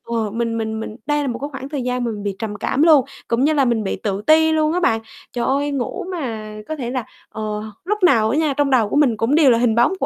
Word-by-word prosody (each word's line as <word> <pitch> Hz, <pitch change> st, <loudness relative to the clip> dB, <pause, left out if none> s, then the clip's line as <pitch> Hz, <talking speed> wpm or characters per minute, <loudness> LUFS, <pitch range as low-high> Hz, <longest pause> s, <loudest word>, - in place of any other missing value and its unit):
ờ, 220 Hz, -3 st, -1 dB
mình 230 Hz, 0 st, -2 dB
mình 220 Hz, 0 st, -3 dB
mình 220 Hz, -1 st, -6 dB
đây 295 Hz, +1 st, +1 dB
là 285 Hz, -, -2 dB
một 240 Hz, -1 st, -3 dB
cái 285 Hz, +1 st, -4 dB
khoảng 270 Hz, 0 st, -7 dB
thời 285 Hz, -3 st, -3 dB
gian 250 Hz, 0 st, -1 dB
mà 235 Hz, -, -1 dB
mình 205 Hz, -2 st, -6 dB
bị 200 Hz, -2 st, -3 dB
trầm 220 Hz, -2 st, -4 dB
cảm 270 Hz, +7 st, 0 dB
luôn, 305 Hz, -6 st, +6 dB, 0.2 s
cũng 235 Hz, +3 st, +1 dB
như 310 Hz, +2 st, +3 dB
là 280 Hz, -3 st, +3 dB
mình 235 Hz, -3 st, +1 dB
bị 195 Hz, -, -2 dB
tự 200 Hz, -1 st, -3 dB
ti 320 Hz, 0 st, +5 dB
luôn 310 Hz, 0 st, +2 dB
á 360 Hz, -, +1 dB
bạn. 225 Hz, -9 st, +1 dB, 0.3 s
Trời 240 Hz, -1 st, -1 dB
ơi, 285 Hz, +2 st, 0 dB
ngủ 265 Hz, +2 st, -3 dB
mà 225 Hz, -11 st, -5 dB
có 315 Hz, -, -3 dB
thể 250 Hz, -5 st, -4 dB
là, 255 Hz, -3 st, -3 dB, 0.2 s
ờ, 220 Hz, -, -7 dB, 0.4 s
lúc 420 Hz, 0 st, -2 dB
nào 220 Hz, -11 st, +4 dB
á 275 Hz, -, 0 dB
nha, 310 Hz, -3 st, +1 dB
trong 290 Hz, -1 st, +2 dB
đầu 235 Hz, -6 st, +3 dB
của -, -, -2 dB
mình 265 Hz, -7 st, +3 dB
cũng 240 Hz, +7 st, +1 dB
đều 300 Hz, -5 st, +6 dB
là 230 Hz, -, +4 dB
hình 235 Hz, -2 st, +2 dB
bóng 240 Hz, +10 st, +3 dB
của -, -, 0 dB
250 Hz, 295 wpm, -20 LUFS, 225-295 Hz, 0.4 s, luôn